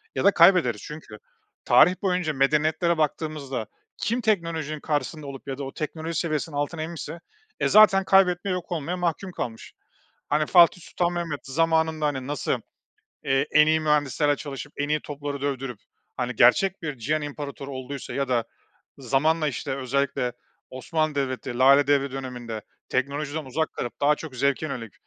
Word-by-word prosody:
ya - - -1
da 200 - +6
kaybederiz. 165 - +5
Çünkü 150 -8 -9 0.5
tarih 160 +9 +6
boyunca 180 -5 0
medeniyetlere 155 +5 +2
baktığımızda 145 -6 -2 0.3
kim 235 +3 -1
teknolojinin 165 -8 -1
karşısında 150 0 -3
olup 140 0 -9
ya 135 0 -4
da 140 - -5
o 135 - -6
teknoloji 160 +1 -4
seviyesinin 155 -2 -2
altına 150 +3 -2
inmişse, 170 +1 -6 0.4
e, - - +2
zaten 205 -2 +6
kaybetmeye, 190 0 +3
yok 180 -1 -5
olmaya 170 +2 -2
mahkum 180 +2 -2
kalmış. 115 -8 -6 0.6
Hani, 150 +1 +2
Fatih 175 0 +5
Sultan 175 +1 -1
Mehmet 170 -4 -3
zamanında, 160 +2 +1
hani, 135 -3 -3
nasıl, 145 +1 -1 0.7
eee, 135 +1 +2
en 150 0 +6
iyi 155 0 +3
mühendislerle 150 -1 +2
çalışıp, 145 0 -7
en 145 - -2
iyi 150 0 +1
topları 145 -1 -6
dövdürüp, 135 -4 -3 0.4
hani, 125 -1 -2
gerçek 175 +10 +4
bir 145 -5 -4
cihan 150 +6 -1
imparatoru 140 -1 -6
olduysa 130 +1 -6
ya 140 -1 -1
da 120 -3 +1 0.5
zamanla, 150 +5 +1
işte, 130 0 -4
özellikle 135 -2 -1 0.4
Osmanlı 155 +4 -2
Devleti 130 -3 -3
Lale 140 +2 +6
Devri 140 -1 +2
döneminde 120 -5 -6 0.3
teknolojiden 145 +3 -2
uzak 160 +5 -2
kalıp 120 - -5
daha 145 +1 +5
çok 150 -6 -9
zevke 140 +4 +1
yönelik, 115 -8 -6
150 Hz, 155 wpm, -25 LUFS, 135-160 Hz, 0.7 s, da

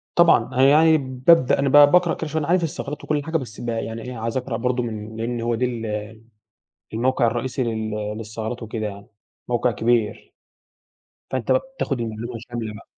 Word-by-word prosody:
طبعًا - - +5
أنا 130 - +3
يعني 160 +2 +6
بابدأ 130 +2 +3
أنا 140 0 +2
ب - - -1
باقرأ 160 +4 +6
كل 160 - -5
شوية 160 +2 -1
أنا 145 - -4
عارف 180 0 +3
الثغرات 150 -2 -4
وكل 145 -1 -1
حاجة 160 +1 -1
بس 120 -8 -5
ب 120 - -5
يعني 115 0 -3
إيه 125 0 -7
عايز 115 +3 -3
أقرأ 125 -2 -2
برضه 125 +1 0
من 110 -1 -6
لأن 115 +1 -3
هو 115 0 0
ده 125 +2 +1
ال 110 -2 -5 0.7
الموقع 125 +1 +2
الرئيسي 125 +3 -2
لل 110 -2 -2 0.3
للثغرات 110 +2 -5
وكده 110 0 -4
يعني 100 0 -9 0.4
موقع 120 0 +1
كبير. 115 -1 0 1.0
فأنت 130 -1 -1
بقى 130 - +4
بتاخد 135 - -2
المعلومة 115 +1 -4 0.2
شاملة 115 -3 -4
بقي. - - -13
120 Hz, 185 wpm, -22 LUFS, 110-135 Hz, 1.0 s, يعني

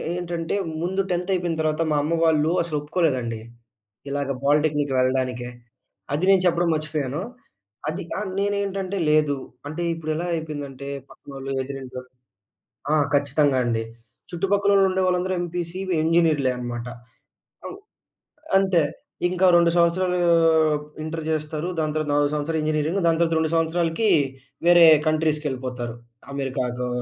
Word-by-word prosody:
ఏంటంటే, 170 -1 -3 0.3
ముందు 190 +3 0
10థ్ 180 +2 -1
అయిపోయిన 175 -2 -1
తర్వాత 155 0 0
మా 150 - +2
అమ్మ 165 +3 0
వాళ్ళూ 155 0 +3
అసలొప్పుకోలేదండి, 150 -7 -1 0.7
ఇలాగ 140 0 -2
పాలిటెక్నిక్‌కి 145 -1 +2
వెళ్ళడానికే. 130 -1 0 0.6
అది 155 +5 0
నేను 195 -1 +6
చెప్పడం 175 0 +2
మర్చిపోయాను. 150 -1 -3 0.7
అది 155 - -4 0.2
ఆహ్, 210 -3 -4
నేనేంటంటే 200 -1 -1
లేదు. 150 -2 +3 0.3
అంటే, 155 +4 -5
ఇప్పుడెలా 160 +1 -3
అయిపోయిందంటే 145 -4 -6 0.2
పక్కనోళ్ళు, 135 -1 -9
ఎదురింటొళ్ళు 130 -2 -8 0.8
ఆ! - - +5 0.2
ఖచ్చితంగా 145 -1 +2
అండి. 115 -1 0 0.5
చుట్టుపక్కళ్ళోల్లుండే 195 +1 +2
వాళ్ళందరూ 180 +1 0
ఎంపీసీ. 175 +1 -4 0.2
ఇంజినీర్‌లే 160 -5 +3
అనమాట. 120 -1 -5 0.8
అవ్ - - -6 0.8
అంతే. 190 -4 +3 0.5
ఇంకా 185 +1 +2
2 170 -1 +5
సంవత్సరాలూ 180 +1 +2 0.9
ఇంటర్ 160 +1 -4
చేస్తరు. 155 +1 -2
దాని 155 -1 0
తర్వాత 155 -1 -1
4 145 0 +2
సంవత్సరాలు 155 +2 -1
ఇంజినీరింగ్, 155 +4 0
దాని 165 -1 +3
తర్వాత 165 -1 +1
2 160 0 0
సంవత్సరాలకి, 165 +5 +1 0.6
వేరే 175 -1 +8 0.2
కంట్రీస్‌‌కెళ్ళిపోతారు. 135 -6 -2 0.4
అమెరికాకో 125 -2 -2
155 Hz, 115 wpm, -23 LUFS, 140-175 Hz, 0.9 s, వేరే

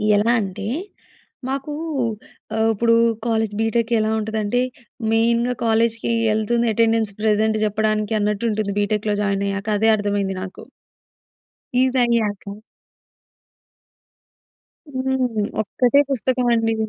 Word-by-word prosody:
ఎలా 215 +3 +3
అంటే, 195 0 -5 0.8
మాకూ 275 +2 -3 0.8
ఆహ్, 220 0 +2
ఇప్పుడు 230 +2 +3 0.3
కాలేజ్, 220 -2 0
బిటెక్ 230 +1 0
ఎలా 215 0 +1
ఉంటుందంటే, 220 +2 -1 0.5
మెయిన్‌గా 235 +2 +2
కాలేజ్‌కి 230 +1 +1 0.2
ఎళ్తుంది 235 +2 +1
అటెండెన్స్ 225 -1 +2
ప్రెజెంట్ 220 0 +2
చెప్పడానికి 215 +1 0
అన్నట్టు 210 +2 0
ఉంటుంది 210 -1 -2
బిటెక్‌లో 210 0 0
జాయిన్ 200 -1 0
అయ్యాక. 200 +2 -4
అదే 220 +1 +4
అర్థమైంది 200 -2 -1
నాకు. 190 - -9 1.2
ఇదయ్యాక. 235 -6 0 2.4
హ్మ్. 260 -5 0 0.2
ఒక్కటే 250 +6 +2
పుస్తకమండి. 240 -3 +1
220 Hz, 95 wpm, -21 LUFS, 210-235 Hz, 2.4 s, అదే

